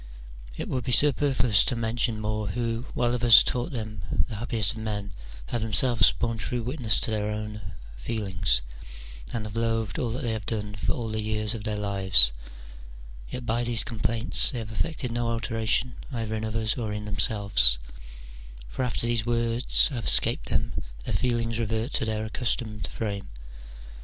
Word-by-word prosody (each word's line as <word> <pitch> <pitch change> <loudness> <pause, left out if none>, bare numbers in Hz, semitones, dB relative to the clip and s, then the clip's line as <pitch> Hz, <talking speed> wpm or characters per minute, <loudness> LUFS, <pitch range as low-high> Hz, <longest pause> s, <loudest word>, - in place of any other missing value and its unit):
It - - -4
would 130 -2 -2
be 125 - -3
super 145 +2 +5
fluous 115 -5 +3
to 125 - +1
mention 115 0 -1
more 105 0 -2
who, 115 +4 -3
while 120 0 +1
others 120 -2 +8
thought 125 +7 -2
them 110 - -3
the 110 - -6
happiest 110 -2 +1
of 115 - -8
men, 105 -2 -4 0.3
have 115 - -3
themselves 115 +2 +4
borne 115 -1 -3
true 120 +4 -2
wit 130 +7 -5
ness 110 -5 +2
to - - 0
their 105 -1 -1
own 105 0 -5 0.4
feelings, 95 - +1 0.7
and 115 -2 -4
have 105 0 -7
loathed 115 -1 -1
all 120 - -1
that 130 +4 -4
they 115 - -1
have 110 -3 -5
done 105 -2 -3
for 100 - -2
all 115 -2 -4
the 110 0 -2
years 110 0 -1
of 110 -2 -7
their 105 -2 -1
lives: 95 -10 +5 1.0
yet 125 -1 -6
by 120 +1 0
these 115 -4 +2
complaints 115 +1 0
they 125 - -3
have 110 -2 -6
effected 140 +1 -3
no 120 0 -1
alteration 115 +1 -1 0.2
either 115 -3 -4
in 110 0 -3
others 110 0 -1
or 110 -3 -3
in 105 0 -5
themselves: 100 - +3 0.9
for - - -4
after 120 -1 -1
these 120 -2 0
words 120 +3 +3
have 125 -6 -5
escaped - - +2
them - - -1 0.3
their - - -3
feelings 115 -2 -1
revert 110 +3 -2
to - - 0
their 110 0 -2
accustomed 110 -1 -3
frame. 100 -3 -5
110 Hz, 175 wpm, -26 LUFS, 105-120 Hz, 1.0 s, others